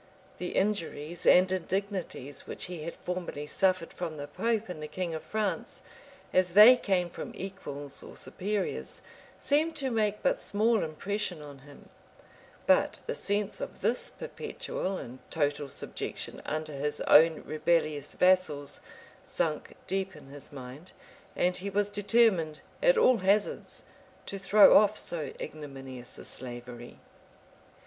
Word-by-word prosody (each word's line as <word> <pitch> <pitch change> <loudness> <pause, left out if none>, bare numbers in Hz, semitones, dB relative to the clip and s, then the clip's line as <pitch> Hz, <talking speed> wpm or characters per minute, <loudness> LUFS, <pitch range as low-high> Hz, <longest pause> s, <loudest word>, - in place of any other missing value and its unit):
The 180 - -4
injuries 175 -5 -1
and 185 +1 +7
indignities 185 -6 -3
which - - -4
he 175 -3 -4
had 170 - -5
formerly 175 -5 -4
suffered 185 +2 +1
from 165 -3 -5
the 145 0 -5
pope 225 +8 -1
and 175 -4 -7
the 150 - -4
king 170 +2 -3
of 160 - -4
France, 215 -1 -2 0.5
as 185 -1 +2
they 215 +5 +11
came 190 -7 +1
from 175 - -7
equals 145 -7 -6
or - - -11
superiors, 185 - -3 0.3
seemed 310 +3 +2
to 270 -4 -1
make 210 -2 0
but - - +2
small 220 +2 +2
impression 180 +1 -3
on 145 -2 -10
him; 145 +1 -15 0.8
but - - +3
the - - -2
sense 205 - 0
of - - -6
this - - +1
perpetual 190 0 -4
and 125 -3 -8
total 145 -2 0
subjection - - -5
under 155 0 -3
his 150 +1 -1
own 160 +1 +6
rebellious 155 -2 0
vassals, 180 -6 +2 0.4
sunk - - -2
deep 190 -1 -2
in 140 -3 -13
his 140 0 -8
mind; 135 +5 -9 0.4
and 180 0 +2
he 200 +2 -4
was 205 +1 0
determined, 205 -7 +3 0.2
at - - +5
all 255 - +6
hazards, 200 +1 0 0.4
to 195 - -5
throw 200 +2 +7
off 210 0 +6
so 155 -5 -3
ignominious 135 -5 -7
a - - -9
slavery. 120 -1 -6
180 Hz, 140 wpm, -30 LUFS, 150-205 Hz, 0.8 s, they